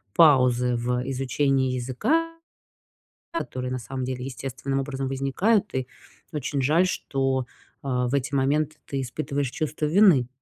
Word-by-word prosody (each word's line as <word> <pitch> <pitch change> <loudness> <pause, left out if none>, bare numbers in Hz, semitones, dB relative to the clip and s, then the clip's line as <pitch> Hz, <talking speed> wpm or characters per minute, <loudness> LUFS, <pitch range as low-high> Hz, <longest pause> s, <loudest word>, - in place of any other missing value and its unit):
паузы 125 -6 +5
в, 125 +1 -1
э, 135 - -5
изучении 135 0 +1
языка, 310 - 0 1.0
которые, 130 - -4
на 130 - -1
самом 130 +2 -5
деле, 125 0 -4
естественным 135 +1 -3
образом 135 -1 -3
возникают. 180 +11 +1
И 130 -1 -1 0.5
очень 140 -1 -2
жаль, 165 +7 +4
что, 135 -6 -1 0.4
а, 125 -2 0
в 135 - 0
эти 140 +1 -1
моменты 150 +3 +1
ты 135 -1 -2
испытываешь 140 0 -3
чувство 155 0 -2
вины. 160 - +5
135 Hz, 140 wpm, -25 LUFS, 125-150 Hz, 1.0 s, паузы